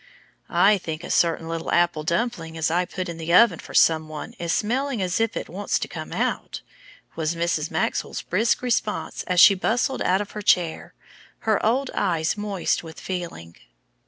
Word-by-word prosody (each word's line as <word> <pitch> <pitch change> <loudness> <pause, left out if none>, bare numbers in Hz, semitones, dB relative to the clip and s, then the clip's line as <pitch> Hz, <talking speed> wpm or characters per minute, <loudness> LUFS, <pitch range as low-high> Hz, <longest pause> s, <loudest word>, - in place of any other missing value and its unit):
"I 200 +1 +4
think 160 -1 -6
a - - -5
certain 165 -1 +2
little 165 0 -4
apple 175 -2 +2
dumpling 165 0 -2
as 160 0 0
I 180 +2 +1
put 185 +1 -5
in 170 -1 -7
the 165 +1 -3
oven 210 -5 +6
for - - -10
some 160 -1 +4
one 155 +9 -7
is 170 -1 -2
smelling 250 +5 0
as 185 0 -1
if 225 0 0
it - - -4
wants - - -2
to - - -4
come - - -8
out," - - -2 0.5
was 160 +1 -1
Mrs. 165 -2 -1
Maxwell's - - -2
brisk 220 +7 +1
response 230 -3 -1
as 180 -1 +2
she 200 - +9
bustled 235 +7 0
out 185 +1 +2
of 205 0 -5
her 210 - -6
chair, 175 -4 +1 0.5
her 220 -2 +1
old 255 +5 +1
eyes 165 -5 0
moist 205 -3 -1
with 160 -1 -10
feeling. 165 - -6
180 Hz, 185 wpm, -24 LUFS, 165-210 Hz, 0.5 s, she